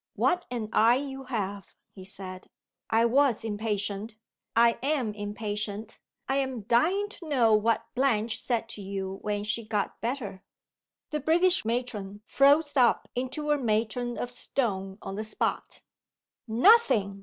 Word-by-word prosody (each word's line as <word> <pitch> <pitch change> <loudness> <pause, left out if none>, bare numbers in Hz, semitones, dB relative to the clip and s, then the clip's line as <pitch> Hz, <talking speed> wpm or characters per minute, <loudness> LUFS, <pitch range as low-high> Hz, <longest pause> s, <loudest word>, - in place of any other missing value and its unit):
"What 360 -1 +1
an 235 -4 -4
eye 230 +2 +5
you 270 0 -5
have!" 200 -6 -4 0.2
he 190 - -11
said. 185 -1 -8 0.4
"I 225 +1 +4
was 255 -1 +3
impatient. 210 0 -3 0.4
I 235 0 +4
am 265 -6 0
impatient. 210 +1 -5 0.3
I 270 - +1
am 265 -4 -1
dying 320 - +2
to 345 -6 -11
know 240 -6 +4
what 220 +2 +2
Blanche 235 -4 +1
said 235 -2 -1
to 220 -2 -7
you 195 0 -5
when 205 -1 -2
she 215 +2 -1
got 210 -2 -2
better?" 225 -6 -4 0.7
The 300 - -1
British 345 +2 +3
Matron 215 -4 -3
froze 290 +3 +4
up 245 -4 +3
into 260 +4 -2
a 295 - +2
matron 235 +1 -1
of 245 - -4
stone 195 -7 -2
on 195 - -5
the 215 - -2
spot. 215 - -3 0.6
"Nothing!" 230 - +4
230 Hz, 145 wpm, -28 LUFS, 205-265 Hz, 0.7 s, eye